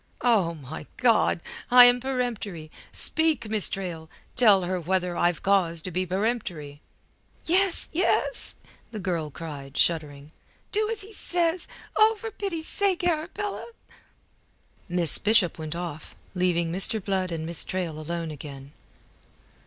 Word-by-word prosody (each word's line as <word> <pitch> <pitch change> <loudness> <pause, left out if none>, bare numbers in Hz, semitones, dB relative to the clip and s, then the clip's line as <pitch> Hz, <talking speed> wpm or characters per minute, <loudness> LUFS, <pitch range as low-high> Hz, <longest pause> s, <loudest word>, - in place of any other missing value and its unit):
"Oh, 200 -9 +2
my 150 0 -9
God! 230 -8 +3 0.3
I 245 0 +10
am 245 0 +5
peremptory! 235 -11 -3 0.2
Speak, 320 -7 +1
Miss 215 -3 +3
Trail!, 170 -4 -5 0.3
tell 210 -6 +5
her 180 0 -2
whether 180 +1 0
I've 175 -1 +1
cause 185 -4 +2
to 185 - -5
be 185 +2 -1
peremptory." 180 -8 -3 0.6
"Yes, 370 +2 +2
yes," 375 +8 0 0.3
the 220 - -7
girl 175 -6 -2
cried, 145 -3 -8
shuddering. 150 -3 0 0.4
"Do 425 +1 0
as 445 -2 -4
he 415 +3 -11
says 345 -2 +1 0.3
Oh, 435 +1 +5
for 450 +1 -6
pity's 350 -6 -4
sake, 390 -3 0
Arabella." 355 +5 -2 1.2
Miss 175 -3 -1
Bishop 210 -6 +3
went 155 0 -4
off, 170 -3 -6 0.2
leaving 175 -2 +1
Mr. 195 +5 +2
Blood 190 -2 -1
and 160 -1 -3
Miss 170 -1 0
Traill 175 -4 -3
alone 165 +1 -4
again. 140 -2 -9
185 Hz, 135 wpm, -26 LUFS, 165-250 Hz, 1.2 s, I